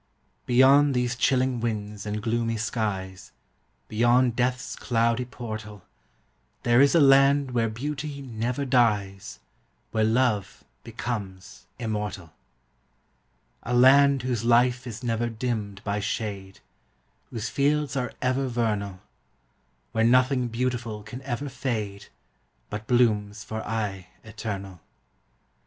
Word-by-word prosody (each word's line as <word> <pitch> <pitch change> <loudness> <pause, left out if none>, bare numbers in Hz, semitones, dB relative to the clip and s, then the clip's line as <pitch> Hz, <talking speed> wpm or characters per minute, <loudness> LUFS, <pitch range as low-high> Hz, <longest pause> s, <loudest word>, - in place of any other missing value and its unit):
Beyond 135 +3 +5
these 125 -1 0
chilling 130 0 +1
winds 105 -2 -4
and 105 0 -3
gloomy 115 0 0
skies, 95 -4 -3 0.6
Beyond 120 +2 +3
death's 125 +1 -1
cloudy 115 +1 0
portal, 110 -5 -8 0.8
There 120 +2 +5
is 140 +4 +4
a - - +6
land 140 -1 +5
where 115 -2 +1
beauty 140 +5 -5
never 125 +1 -3
dies, 105 -7 +1 0.5
Where 110 -1 +1
love 110 -2 +1 0.2
becomes 110 -5 -6
immortal; 105 -6 -4 1.3
A 125 - -2
land 135 +1 +6
whose 125 -3 -1
life 125 +2 +3
is 120 +1 -7
never 120 0 -1
dimmed 110 -4 -4
by 100 +1 -1
shade, 100 -2 -4 0.7
Whose 115 -1 -4
fields 145 0 +1
are 125 -3 -2
ever 130 +1 +1
vernal; 105 -6 -2 0.9
Where 110 - +1
nothing 125 +1 +3
beautiful 120 -2 -3
can 120 +5 -8
ever 135 +1 -4
fade, 110 -7 -4 0.6
But 105 +1 -5
blooms 105 -4 +2
for 110 0 -5
aye 105 -4 -3 0.2
eternal. 100 -4 -6
115 Hz, 110 wpm, -26 LUFS, 105-125 Hz, 1.3 s, a